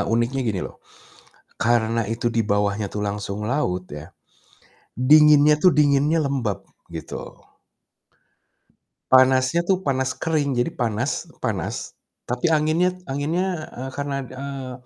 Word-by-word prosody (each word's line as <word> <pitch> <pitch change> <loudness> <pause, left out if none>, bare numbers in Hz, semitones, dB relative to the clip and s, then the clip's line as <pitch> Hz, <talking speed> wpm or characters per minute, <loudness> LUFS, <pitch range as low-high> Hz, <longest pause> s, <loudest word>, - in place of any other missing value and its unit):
uniknya 120 +4 +1
gini 95 -4 -1
loh, - - -13 0.9
karena 115 -1 +2
itu 120 +1 -4
dibawahnya 105 -1 +1
tuh 105 - -2
langsung 100 0 -4
laut 90 -11 -1
ya, 75 +1 -8 1.0
dinginnya 150 0 +7
tuh 185 - +6
dinginnya 145 +2 +3
lembab 120 -9 -2 0.3
gitu. - - -6 1.9
Panasnya 130 +4 +5
tuh 190 -1 +1
panas 130 -2 0
kering, 145 -5 -1
jadi 120 - +1
panas 120 +3 -2 0.2
panas, - - -3 0.3
tapi 125 +7 -1
anginnya 160 +3 +2 0.2
anginnya, 160 +4 -2
eee, 130 +2 -5
karena, 140 0 -3
eee, 130 0 -7
130 Hz, 115 wpm, -23 LUFS, 115-150 Hz, 1.9 s, dinginnya